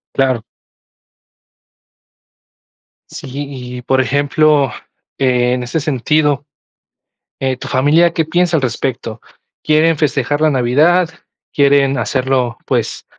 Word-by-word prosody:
Claro. 130 -4 +1 2.7
Sí, - - -9 0.5
y, - - -9
por 130 +2 +1
ejemplo, 145 0 +2 0.5
en 125 -1 +1
ese 125 +6 -2
sentido, 145 0 0 1.0
eh, 130 -1 -1
tu - - -8
familia, 150 +6 +3
¿qué 160 - 0
piensa 175 +1 +1
al 145 - -1
respecto? 120 -2 -3 0.4
¿Quieren 155 +1 +3
festejar 145 -1 0
la 155 - +4
Navidad? 150 +7 +2 0.4
¿Quieren 140 -1 +3
hacerlo, 130 -2 -1
pues, - - -2
140 Hz, 100 wpm, -16 LUFS, 130-155 Hz, 2.7 s, la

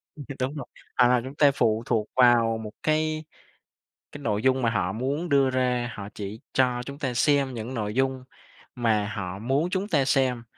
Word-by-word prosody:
ừ, 145 - -8
đ - - -4
đúng 130 +4 -2
rồi, 140 -4 -5 0.3
à, 125 0 +4
chúng 135 +2 -8
ta 145 -2 +5
phụ 115 -4 +1
thuộc 110 -3 0
vào 120 -3 +4
một 105 - -7
cái 155 0 0 0.9
cái 145 - -8
nội 105 -1 0
dung 130 0 +3
mà 115 - +2
họ 95 -4 0
muốn 140 +9 -2
đưa 140 -2 +4
ra, 125 -2 0
họ 100 0 -7
chỉ 105 +2 -6
cho 125 -2 +2
chúng 140 +1 -8
ta 130 -5 -2
xem 135 +2 +2
những 115 +3 -5
nội 105 -3 -3
dung 130 -1 0 0.5
mà 110 -4 +1
họ 95 -1 -5
muốn 135 +9 0
chúng 195 +2 -2
ta 145 -8 +2
xem. 130 -3 +1
125 Hz, 200 wpm, -26 LUFS, 115-140 Hz, 0.9 s, ta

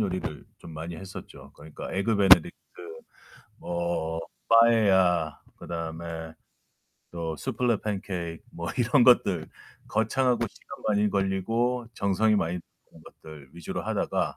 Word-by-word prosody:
요리를 90 -7 -3
좀 80 - -11
많이 80 +2 -6
했었죠. 95 +3 -10
그러니까 80 - -9
에그 105 +3 +1
베네딕트 95 -4 +7 1.1
뭐 85 -2 -2 0.3
빠에야, 95 -8 +4 0.2
그다음에 80 -1 -6 0.8
또 80 -2 -4
수플레 115 - 0
팬케이크, 90 -5 -4
뭐 85 0 -5
이런 125 +1 +4
것들. 95 -10 +4 0.4
거창하고 120 +3 +1
시간 - - -13
많이 105 0 +3
걸리고, 115 +6 0
정성이 105 +2 +2
많이 90 -2 -1 0.3
드는 80 - -17
것들 75 -4 -13
위주로 85 -2 -5
하다가 - - -1
95 Hz, 275 characters per minute, -27 LUFS, 80-110 Hz, 1.1 s, 베네딕트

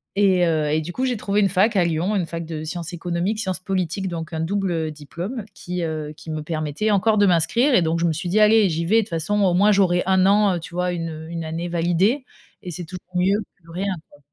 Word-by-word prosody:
et 190 -3 +4
heu, 155 -3 +1
et 155 +1 +1
du 170 +3 -6
coup 260 - -1
j'ai 250 -3 0
trouvé 205 0 0
une 195 - +3
fac 200 +5 +2
à 190 - +4
Lyon, 170 +5 0
une 185 -4 0
fac 165 0 -5
de 160 -1 -5
sciences 165 +1 -5
économiques, 175 +5 -2
sciences 190 -4 -2
politiques 190 0 -2
donc 165 -2 -5
un 160 - -2
double 170 -2 -1
diplôme 175 - -6
qui, 180 -2 -5
heu, 155 -2 -3
qui 160 - -8
me 155 - -3
permettait 155 +5 -2
encore 215 +2 +3
de 205 - +5
m'inscrire 195 - +3
et 180 - +5
donc 165 +1 0
je 170 - +1
me 165 - +2
suis 170 +3 -4
dit: 205 +5 +2
«Allez 215 -1 +5
j'y 165 0 -2
vais, 210 +7 +3
de - - +5
toutes 215 - -7
façons, 170 +5 -1
au 185 - +3
moins, 200 +4 +4
j'aurai 185 -3 +3
1 190 -1 +3
an», 200 -1 +4
heu, - - -3
tu 170 +1 -11
vois? 180 0 0
1 165 -1 -3
heu, 160 0 -8
1 165 -1 -4
année 165 +2 -4
validée 175 - +1 0.4
et 180 - -6
c'est 175 +1 -6
toujours 180 +1 -11
mieux 190 +3 +2 0.2
que 165 - -15
rien, 190 +3 -2 0.2
quoi. 145 - -20
175 Hz, 260 wpm, -22 LUFS, 165-200 Hz, 0.4 s, de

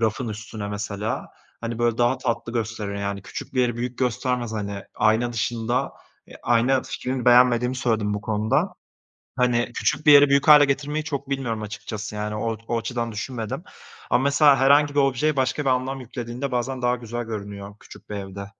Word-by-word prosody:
rafın 115 +2 0
üstüne 110 -1 -6
mesela, 105 +1 -3 0.3
hani, 115 0 -4
böyle, 120 -1 +1
daha 120 +2 +2
tatlı 115 -2 -2
gösterir. 110 -3 -3
Yani 100 -1 -3
küçük 100 - -8
bir 130 - +3
yeri 120 -2 +1
büyük 125 +1 -4
göstermez, 125 -1 -1
hani, 100 -2 -4
ayna 110 +3 +2
dışında. 115 +1 -1 0.3
Eee, - - -13
ayna 125 +3 +3
fikrini 130 -1 -4
beğenmediğimi 125 0 +5
söyledim 110 -5 0
bu 105 - -3
konuda. 110 - 0 0.6
Hani, 125 -2 +2
küçük 150 +1 -1
bir 150 - +9
yeri 145 0 +8
büyük 140 +2 +2
hâle 150 -1 +9
getirmeyi 145 +2 -1
çok 140 -2 -4
bilmiyorum 120 -5 -2
açıkçası. 105 0 -6
Yani, 105 0 -3
o 115 +1 -2
o 120 - 0
açıdan 115 0 -3
düşünmedim 110 0 -4 0.5
ama 125 - +3
mesela 140 0 +5
herhangi 145 +2 +4
bir 145 - +4
objeye 140 +2 +1
başka 130 +2 0
bir 135 - -1
anlam 130 +1 -1
yüklediğinde 125 +2 -5
bazen 125 +1 -2
daha 125 0 +2
güzel 120 0 -5
görünüyor 100 -2 -7
küçük - - -15
bir - - -4
evde. 100 0 -7
120 Hz, 175 wpm, -24 LUFS, 110-130 Hz, 0.6 s, bir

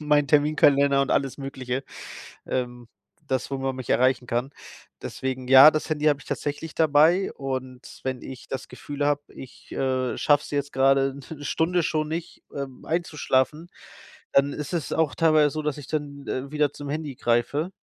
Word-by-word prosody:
mein 150 -1 +2
Terminkalender 140 -1 +4
und 135 - -3
alles 135 -2 0
Mögliche, 135 -1 -4 0.6
ähm, 120 -2 -3 0.4
das, 130 +1 -2
wo 135 - -1
man 135 0 -2
mich 130 -1 -8
erreichen 130 0 +2
kann. 120 +4 -2 0.5
Deswegen, 130 -1 -4
ja, 135 +3 +10
das 155 +1 -3
Handy 155 -1 -1
habe 145 -2 +3
ich - - -16
tatsächlich 150 +2 -4
dabei. 160 +4 +3
Und 130 -2 -6
wenn 130 -1 -3
ich 130 -1 -10
das 135 0 -6
Gefühl 145 0 -4
habe, 145 0 +1
ich, 130 - -12
äh, 130 -2 -1
schaffe 145 0 +3
es - - -10
jetzt 145 -1 -2
grade 135 0 +3 0.2
'ne 145 -2 -8
Stunde 170 +4 +1
schon 155 -1 0
nicht, 165 +2 -6
ähm, 135 -2 -6
einzuschlafen, 155 -1 0 0.6
dann 140 +1 +3
ist 150 +3 -6
es 165 -6 -2
auch 160 -2 +1
teilweise 155 -3 +4
so, 155 - -3
dass 150 -1 -2
ich 145 -3 -9
dann, 145 -2 -4
äh, 135 +2 -4
wieder 150 -2 +1
zum 145 - -8
Handy 150 -2 -4
greife. 120 +9 0
140 Hz, 175 wpm, -25 LUFS, 130-150 Hz, 0.6 s, ja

